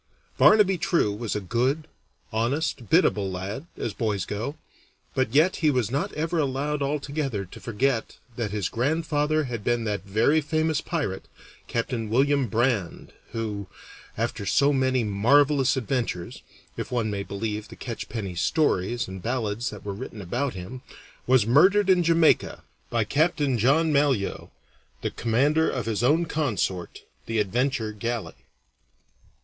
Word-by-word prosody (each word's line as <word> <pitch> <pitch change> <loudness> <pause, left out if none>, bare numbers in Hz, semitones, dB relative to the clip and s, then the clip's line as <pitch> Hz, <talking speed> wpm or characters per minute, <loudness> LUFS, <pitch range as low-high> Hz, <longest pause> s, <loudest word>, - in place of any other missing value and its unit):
Barnaby 200 -4 +6
True 155 - +1
was 110 +1 -3
a - - 0
good, 125 - 0 0.5
honest, 120 +2 -1
biddable 105 - +3
lad, 95 - -5
as 110 - -3
boys 105 -4 -1
go, 115 +9 -4 0.6
but 130 -2 0
yet 165 +5 +4
he 155 - +3
was 125 -5 0
not 140 - -1
ever 165 +2 -1
allowed 145 +1 -1
altogether 140 -6 -2
to 90 - -12
forget 120 +1 -1 0.2
that 115 -3 -2
his 100 -3 -1
grandfather 155 +3 0
had 120 -6 -5
been 120 0 +1
that 105 -3 -2
very 110 +10 +2
famous 155 +1 0
pirate, 145 - -3 0.4
Capt. 115 +2 -2
William 130 +4 +1
Brand, 115 -4 -1 0.2
who, 105 -4 -3 0.5
after - - -2
so 140 +8 +3
many 130 -2 +2
marvelous 135 +7 +3
adventures 115 -8 -3 0.4
(if - - -5
one 115 -4 0
may 100 -1 -2
believe 105 +2 -4
the - - -11
catchpenny 115 -5 -5
stories 120 - +1
and 95 0 -7
ballads 115 -1 -2
that 105 -2 -10
were 100 - -3
written 105 +2 -8
about 120 +8 -2
him), 95 +8 -7 0.5
was 125 -4 +4
murdered 190 - +5
in 180 -1 +4
Jamaica 165 -1 +3 0.3
by 115 -2 +1
Capt. 155 +10 +1
John 145 +3 +2
Malyoe, 140 -8 +1 0.5
the - - -1
commander 145 +8 +2
of - - -3
his 110 -2 -1
own 155 +7 +3
consort, 115 - -2 0.2
the 115 - -1
Adventure 115 +3 0
galley. 115 +1 -4
125 Hz, 145 wpm, -25 LUFS, 105-145 Hz, 0.6 s, Barnaby